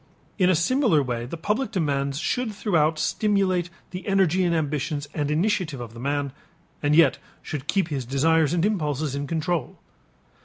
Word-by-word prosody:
In 180 Hz, -1 st, +4 dB
a 185 Hz, -, +4 dB
similar 185 Hz, -, +3 dB
way 120 Hz, -2 st, -3 dB
the 165 Hz, -, -6 dB
public 210 Hz, +9 st, -1 dB
demands 140 Hz, -8 st, -1 dB
should 220 Hz, -, -1 dB
throughout 160 Hz, -7 st, +1 dB
stimulate 190 Hz, -2 st, +1 dB, 0.2 s
the 180 Hz, +3 st, -7 dB
energy 190 Hz, -2 st, +3 dB
and 170 Hz, -1 st, +2 dB
ambitions 145 Hz, -1 st, -2 dB
and 145 Hz, -2 st, -1 dB
initiative 165 Hz, -3 st, 0 dB
of 115 Hz, -2 st, -7 dB
the 115 Hz, -, -10 dB
man, 140 Hz, +1 st, -2 dB, 0.5 s
and 145 Hz, 0 st, +2 dB
yet 165 Hz, 0 st, +5 dB, 0.2 s
should 145 Hz, -2 st, -5 dB
keep 190 Hz, -4 st, +1 dB
his 140 Hz, -4 st, -2 dB
desires 150 Hz, +4 st, +2 dB
and 175 Hz, +1 st, +1 dB
impulses 150 Hz, -8 st, -1 dB
in 140 Hz, 0 st, -3 dB
control. 160 Hz, -3 st, -2 dB
160 Hz, 165 wpm, -25 LUFS, 145-185 Hz, 0.5 s, yet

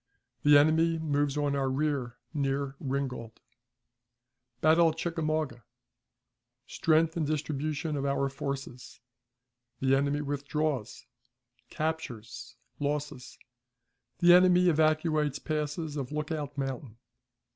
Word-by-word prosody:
The 145 Hz, 0 st, +7 dB
Enemy 160 Hz, +3 st, +4 dB
moves 145 Hz, -2 st, 0 dB
on 145 Hz, -1 st, 0 dB
our 135 Hz, -1 st, 0 dB
Rear 135 Hz, -3 st, -1 dB, 0.2 s
near 140 Hz, -1 st, -1 dB
Ringgold. 130 Hz, -5 st, -4 dB, 1.2 s
Battle 160 Hz, +3 st, +5 dB
at 160 Hz, -, -6 dB
Chickamauga. 155 Hz, -7 st, -2 dB, 1.0 s
Strength 160 Hz, 0 st, +2 dB
and 155 Hz, -3 st, 0 dB
Distribution 155 Hz, 0 st, -2 dB
of 140 Hz, -, -2 dB
our 140 Hz, 0 st, +1 dB
Forces. 135 Hz, -2 st, -6 dB, 0.8 s
The 135 Hz, 0 st, +3 dB
enemy 140 Hz, +1 st, +1 dB
withdraws. 145 Hz, -3 st, -3 dB, 0.6 s
Captures. 155 Hz, -8 st, -5 dB, 0.2 s
Losses. 145 Hz, -3 st, -3 dB, 0.8 s
The 175 Hz, 0 st, +6 dB
Enemy 180 Hz, 0 st, +6 dB
evacuates 155 Hz, -2 st, +2 dB
Passes 150 Hz, 0 st, -3 dB
of 135 Hz, -3 st, -4 dB
Lookout 150 Hz, -1 st, -4 dB
Mountain. 135 Hz, -4 st, -4 dB
145 Hz, 100 wpm, -29 LUFS, 135-155 Hz, 1.2 s, The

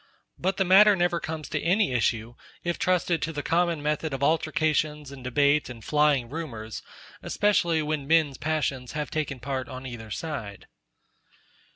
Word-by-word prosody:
But 190 Hz, +2 st, 0 dB
the 195 Hz, -, +2 dB
matter 200 Hz, +3 st, +7 dB
never 175 Hz, -1 st, +1 dB
comes 155 Hz, -3 st, -5 dB
to -, -, -2 dB
any 190 Hz, 0 st, +2 dB
issue, 115 Hz, -1 st, 0 dB, 0.3 s
if 175 Hz, 0 st, -2 dB
trusted 180 Hz, -3 st, +1 dB
to 165 Hz, -, -1 dB
the 145 Hz, -2 st, -4 dB
common 170 Hz, -2 st, +1 dB
method 150 Hz, -1 st, -1 dB
of 135 Hz, -, -4 dB
altercations 155 Hz, -1 st, +1 dB
and 135 Hz, -2 st, -10 dB
debate 140 Hz, +4 st, +2 dB
and 115 Hz, -3 st, -10 dB
flying 150 Hz, -5 st, +2 dB
rumours; 115 Hz, -7 st, -6 dB, 0.4 s
especially 170 Hz, -6 st, +1 dB
when 150 Hz, -2 st, -2 dB
men's 155 Hz, -4 st, +3 dB
passions 140 Hz, -5 st, -2 dB
have 150 Hz, -1 st, -3 dB
taken 145 Hz, -4 st, -2 dB
part 130 Hz, +1 st, -4 dB
on 130 Hz, -1 st, -8 dB
either 120 Hz, -3 st, -7 dB
side. 110 Hz, -7 st, -5 dB
150 Hz, 160 wpm, -26 LUFS, 130-165 Hz, 0.4 s, matter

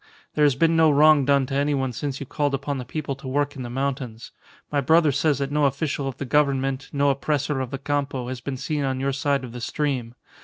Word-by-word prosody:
There 150 Hz, -, +3 dB
has 140 Hz, -3 st, +3 dB
been 165 Hz, +4 st, +3 dB
no 160 Hz, -1 st, +5 dB
wrong 150 Hz, -1 st, +5 dB
done 140 Hz, -1 st, +3 dB
to 135 Hz, -, -6 dB
any 140 Hz, +1 st, +1 dB
one 130 Hz, -2 st, -1 dB
since 140 Hz, +2 st, -4 dB
you 140 Hz, -, -5 dB
called 145 Hz, +1 st, -1 dB
upon 140 Hz, 0 st, -3 dB
the 125 Hz, -, -6 dB
people 140 Hz, +1 st, -4 dB
to 135 Hz, -, -9 dB
work 145 Hz, +2 st, 0 dB
in 135 Hz, -, -6 dB
the 120 Hz, -, -5 dB
mountains. 130 Hz, -3 st, -4 dB, 0.4 s
My 145 Hz, -1 st, +1 dB
brother 160 Hz, +2 st, +4 dB
says 145 Hz, +1 st, +1 dB
that 140 Hz, 0 st, -3 dB
no 150 Hz, 0 st, +2 dB
official 140 Hz, 0 st, -1 dB
of 135 Hz, -, -5 dB
the 140 Hz, -, -4 dB
Government, 135 Hz, -1 st, +1 dB
no 140 Hz, 0 st, +2 dB
oppressor 140 Hz, +1 st, -1 dB
of 130 Hz, -2 st, -3 dB
the 135 Hz, -, -4 dB
Campo, 140 Hz, -2 st, -2 dB
has 125 Hz, -1 st, -5 dB
been 130 Hz, +1 st, -4 dB
seen 150 Hz, +2 st, -2 dB
on 130 Hz, -1 st, -1 dB
your 135 Hz, +1 st, 0 dB
side 140 Hz, 0 st, 0 dB
of 125 Hz, -, -7 dB
the 120 Hz, 0 st, -8 dB
stream. 125 Hz, -3 st, -2 dB
140 Hz, 245 wpm, -24 LUFS, 130-145 Hz, 0.4 s, no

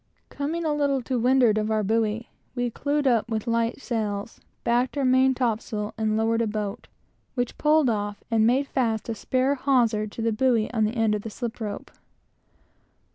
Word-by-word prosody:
Coming 320 Hz, +4 st, -3 dB
a 305 Hz, -, +1 dB
little 280 Hz, -3 st, +1 dB
to 255 Hz, 0 st, -1 dB
windward 245 Hz, -3 st, +4 dB
of 215 Hz, 0 st, -1 dB
our 215 Hz, -1 st, +1 dB
buoy, 225 Hz, +2 st, 0 dB, 0.3 s
we 245 Hz, -1 st, -1 dB
clewed 290 Hz, +4 st, -1 dB
up 240 Hz, -4 st, +3 dB
the 225 Hz, 0 st, -3 dB
light 230 Hz, +1 st, 0 dB
sails, 215 Hz, -4 st, -3 dB, 0.2 s
backed 245 Hz, +4 st, +1 dB
our 275 Hz, -, +1 dB
main 260 Hz, +1 st, +4 dB
topsail, 220 Hz, -3 st, -2 dB
and 220 Hz, -1 st, 0 dB
lowered 225 Hz, +1 st, +1 dB
a 230 Hz, -, +1 dB
boat, 210 Hz, +1 st, -4 dB, 0.5 s
which 245 Hz, -2 st, -2 dB
pulled 305 Hz, -1 st, +4 dB
off, 205 Hz, -2 st, -2 dB
and 220 Hz, -1 st, +4 dB
made 260 Hz, +4 st, +2 dB
fast 235 Hz, -5 st, -1 dB
a -, -, 0 dB
spare 260 Hz, +4 st, 0 dB
hawser 245 Hz, -6 st, +2 dB
to 215 Hz, -, -7 dB
the 230 Hz, -, +2 dB
buoy 230 Hz, 0 st, +1 dB
on 220 Hz, -2 st, +2 dB
the 215 Hz, +3 st, -2 dB
end 225 Hz, -2 st, +2 dB
of 210 Hz, -, -1 dB
the 225 Hz, -, -6 dB
slip 235 Hz, +2 st, -5 dB
rope. 205 Hz, -2 st, -5 dB
230 Hz, 185 wpm, -25 LUFS, 215-260 Hz, 0.5 s, windward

